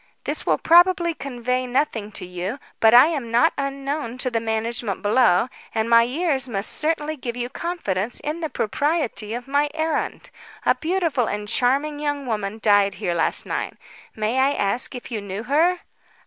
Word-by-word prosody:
This - - -2
will - - +3
probably 345 0 +4
convey 255 -3 -3
nothing 245 -5 -1
to - - -5
you, 180 +6 -4 0.2
but 225 - +6
I 245 - +10
am 280 -8 -3
not 235 +1 +3
unknown 275 -2 -3
to 255 0 -1
the 230 - +1
management 225 -2 -2
below, 210 -2 +4 0.3
and 220 0 +1
my 230 0 +6
years 265 +1 0
must 200 -2 -2
certainly 310 0 -1
give 245 -4 -5
you 245 0 -2
confidence 245 - -3
in 305 +3 -3
the 320 -2 -3
propriety 250 -3 -1
of 245 +1 -7
my 285 +2 +1
errand. 320 0 -2 0.3
A - - +5
beautiful 325 -8 0
and 210 0 -3
charming 275 +6 +1
young 290 -2 -2
woman 215 -3 -3
died 205 -2 +4
here 180 -2 -2
last 170 - +1
night. - - -4 0.4
May 220 +4 0
I 275 +2 +3
ask 220 +3 0
if 250 - -8
you 220 -3 -3
knew 200 +2 -5
her?" 325 +8 +2
250 Hz, 175 wpm, -23 LUFS, 220-295 Hz, 0.4 s, I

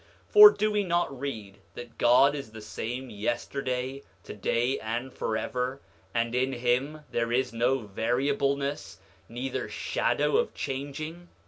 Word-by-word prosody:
9:9 - - -31
For 420 0 +12
do 215 - 0
we 210 -1 +1
not 175 -7 -1
read 110 -8 -6 0.2
that 120 -1 -10
God 130 +4 +5
is 140 -6 -7
the 110 - -9
same 125 +4 -5
yesterday, 125 +4 -3 0.2
today, 120 +5 -1
and 120 +4 -4
forever, 125 +4 -2 0.3
and 115 0 -1
in 130 +2 +1
him 125 +5 0
there 115 -1 -1
is 125 0 0
no 120 +3 +2
variableness 140 +6 -1 0.3
neither 125 +3 -4
shadow 435 - 0
of 475 0 0
changing? 155 +6 -5
130 Hz, 135 wpm, -28 LUFS, 120-140 Hz, 0.3 s, For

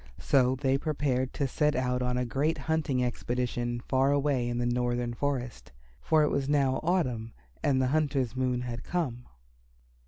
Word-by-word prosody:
So 130 -1 +3
they 135 0 +1
prepared 135 -4 -1
to 140 - -1
set 150 +3 +1
out 125 0 0
on 125 0 0
a 125 - 0
great 140 +6 0
hunting 155 -5 0
expedition 120 -1 -2
far 135 +2 +2
away 140 -4 +1
in 120 - -2
the 120 - 0
northern 120 0 0
forest, 125 - -3 0.3
for 155 -1 +3
it 150 - +2
was 140 0 -1
now 140 -3 +2
autumn, 130 -10 0 0.3
and 135 -3 +2
the 130 -1 +2
hunter's 140 -6 0
moon 125 -1 0
had 120 -1 -5
come. 130 -9 -3
130 Hz, 165 wpm, -29 LUFS, 125-145 Hz, 0.3 s, So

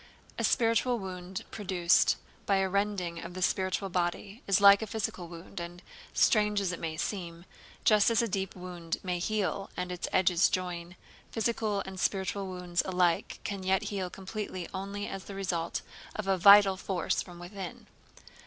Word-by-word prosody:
A - - 0
spiritual 235 +1 +3
wound 185 -2 -6
produced 180 -4 +3 0.3
by 200 - +4
a 195 0 +2
rending 190 -3 -1
of 175 +1 -8
the 185 - -5
spiritual 190 +2 0
body 180 +5 -2
is 195 -1 +4
like 200 0 +8
a 220 - -3
physical 195 -4 -3
wound 170 +1 -9
and, 175 +1 -7 0.3
strange 210 -3 +3
as 195 -2 0
it 180 - -5
may 160 -1 -4
seem, 170 -2 -4 0.4
just 210 0 +5
as 230 - +2
a 235 - +2
deep 195 -2 -2
wound 180 -2 -5
may 180 -2 -1
heal 200 0 -1
and 180 0 -3
its 180 - -3
edges 180 -1 +4
join, 175 -1 -3 0.4
physical 220 -3 0
and 190 -1 -7
spiritual 195 0 -1
wounds 180 -1 -1
alike 180 -2 +1
can 200 -2 -4
yet 190 0 +1
heal 190 -2 -2
completely 190 -1 -5
only 200 +2 -4
as 195 - -6
the 200 - -8
result 180 -4 -2 0.3
of 215 - -3
a 195 - +3
vital 200 +1 +8
force 185 -2 -1
from 175 -2 -10
within. 180 +1 -8
190 Hz, 170 wpm, -30 LUFS, 180-200 Hz, 0.4 s, like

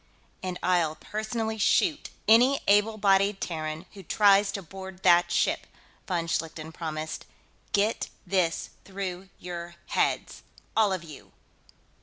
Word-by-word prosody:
"And 185 -1 -3
I'll 175 -4 +2
personally 220 +3 -3
shoot 310 - +2 0.2
any 245 +5 +6
able 210 +2 +4
bodied 195 0 +3
Terran 155 0 -4
who 200 - -10
tries 200 +2 +4
to 195 - -4
board 190 +2 -10
that 175 0 +5
ship," - - +1 0.4
von 175 -3 -1
Schlichten 160 -1 -3
promised. 160 -1 -5 0.4
"Get 210 +2 +1 0.2
this 180 -4 0
through 190 -1 -5
your 175 -1 -7
heads, - - 0 0.3
all 215 -3 +4
of 185 -2 -2
you. 155 -4 -12
190 Hz, 125 wpm, -27 LUFS, 170-205 Hz, 0.4 s, any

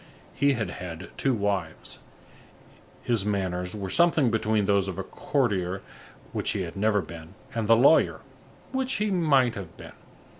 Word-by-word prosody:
He 140 0 +3
had 110 -8 -2
had 90 -1 -7
two 135 -2 +1
wives. 100 -6 -3 1.0
His 115 -5 +1
manners 95 -2 -2
were 95 -3 -4
something 165 -7 +4
between 110 -1 +1
those 100 -1 +2
of 95 - -4
the 95 - -4
courtier, 100 -8 -1 0.5
which - - -2
he 100 - -2
had 85 - -7
never 105 0 +2
been, 85 +2 -11 0.2
and 115 -2 -2
the 115 - +7
lawyer, 140 +6 +4 0.5
which 265 0 -1
he 210 0 0
might 140 -9 +3
have 95 -6 -8
been. - - -11
105 Hz, 155 wpm, -26 LUFS, 95-130 Hz, 1.0 s, the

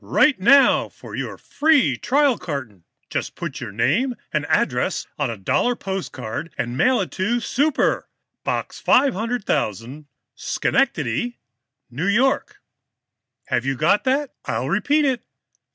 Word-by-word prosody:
"Write 290 -8 +3
now 275 +8 +5
for - - -13
your - - -4
free 285 - +2
trial 275 - +2
carton. 130 - -6 0.3
Just - - -3
put 170 -7 -6
your 120 -5 -5
name 175 - +1 0.2
and 150 -1 0
address 125 +8 0
on 145 -4 0
a 115 - -5
dollar 240 - +1
postcard, 170 - -5
and 120 +1 -3
mail 255 - +3
it - - -4
to 225 +6 0
'Super,' 280 +5 0 0.3
Box - - -3
500,000, 190 - 0 0.3
Schenectady, 240 - 0 0.6
N. - - -7 0.2
Y. 270 +2 +3 1.1
Have - - 0
you 135 0 -1
got 165 +9 +2
that? 270 +1 0
I'll - - -2
repeat 295 +1 +2
it. 255 -3 0
195 Hz, 130 wpm, -22 LUFS, -, 1.1 s, now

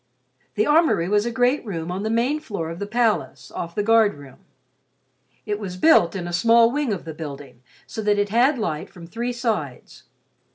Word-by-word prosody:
The 215 - +2
armory 300 - +3
was 210 +3 +1
a - - -2
great 250 +4 +1
room 175 -6 -5
on 185 +2 -3
the 215 - -2
main 240 +7 +1
floor 200 - -5
of 165 - -8
the 200 - -4
palace, 215 - -1
off 170 -1 -6
the 210 - 0
guard 225 -1 +4
room. 140 -2 -14 1.1
It 210 0 -2
was 185 -4 -6
built 185 - +4
in 175 -2 -4
a 175 - -6
small 230 +5 +5
wing 290 -3 -1
of 195 -5 -4
the 160 - -6
building 145 -5 -9 0.2
so 220 - -6
that 210 -1 +1
it 205 0 0
had 250 +6 +3
light 160 -9 -3
from 175 -2 -12
three 235 +8 -4
sides. 220 - -4
210 Hz, 200 wpm, -22 LUFS, 170-235 Hz, 1.1 s, small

